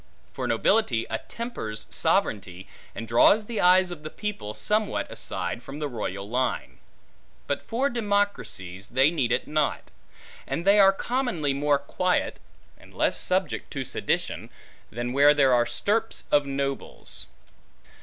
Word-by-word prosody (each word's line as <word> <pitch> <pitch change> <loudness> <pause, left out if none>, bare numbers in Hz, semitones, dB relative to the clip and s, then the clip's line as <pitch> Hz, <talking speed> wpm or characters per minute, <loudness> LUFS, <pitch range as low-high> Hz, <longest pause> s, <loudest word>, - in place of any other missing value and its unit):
For - - -3
nobility 120 - +2
attempers 115 - -5
sovereignty, 95 -2 0 0.3
and 115 - -6
draws 200 - +5
the 225 0 -2
eyes 185 0 +5
of 170 -4 -7
the 155 - -6
people, 130 - -5
somewhat 210 - -1
aside 120 - -3
from 135 +3 -9
the 150 -1 -2
line 110 -7 -4
royal. 115 +6 -1 0.8
But 140 - -2
for 250 +5 0
democracies, 205 - -2
they 135 +5 +3
need 130 -8 0
it 125 - 0
not; 150 -1 -1 0.6
and 170 - -3
they 200 +1 +6
are 195 -1 +8
commonly 195 - -1
more 145 +1 +2
quiet, 180 +6 -1 0.4
and - - -17
less - - +2
subject - - -1
to - - -2
sedition, - - -2 0.4
than 120 +2 -4
where 145 +2 +6
there 135 -3 +4
are 120 -1 +3
stirps 215 - -1
of 145 -1 +4
nobles. 140 0 -4
145 Hz, 140 wpm, -26 LUFS, 120-200 Hz, 0.8 s, are